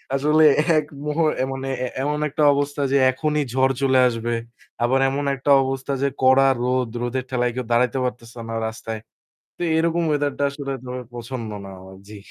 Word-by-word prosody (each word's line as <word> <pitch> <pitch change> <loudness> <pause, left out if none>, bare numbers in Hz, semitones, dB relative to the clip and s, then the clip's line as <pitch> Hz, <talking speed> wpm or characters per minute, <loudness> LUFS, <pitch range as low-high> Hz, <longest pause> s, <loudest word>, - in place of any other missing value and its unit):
আসলে 150 +3 +3 0.3
এক 150 - +1 0.2
মুহূ 150 +2 0
অ্যা 130 - 0
মানে 135 0 -5 0.2
এ - - -2 0.2
এমন 150 +1 -1
একটা 150 +2 -1
অবস্থা 145 +1 -2
যে 140 - +4
এখনই 150 +2 -1
ঝড় 130 +1 +3
চলে 130 -1 +3
আসবে। 120 -1 -2 0.5
আবার 130 +3 +2
এমন 140 +2 -2
একটা 135 +2 0
অবস্থা 135 +1 -3
যে 140 - +2
কড়া 130 +1 +5 0.2
রোদ, 125 -1 0
রোদের 125 +1 -2
ঠেলায় 125 -1 0
কেউ 125 -1 -3
দাঁড়াইতে 125 +3 +2
পারতেছে 120 -1 -5
না 115 - -3
রাস্তায়। 110 0 -6 0.6
তো - - -10 0.2
এরকম 165 +1 +1
weather 145 -1 +1
টা - - +1
আসলে 140 -1 -6
তবে 125 0 -5
পছন্দ 120 -1 -6 0.2
না - - -9
আমার। 95 +1 -13
জি। 105 - -9
130 Hz, 185 wpm, -22 LUFS, 120-145 Hz, 0.6 s, কড়া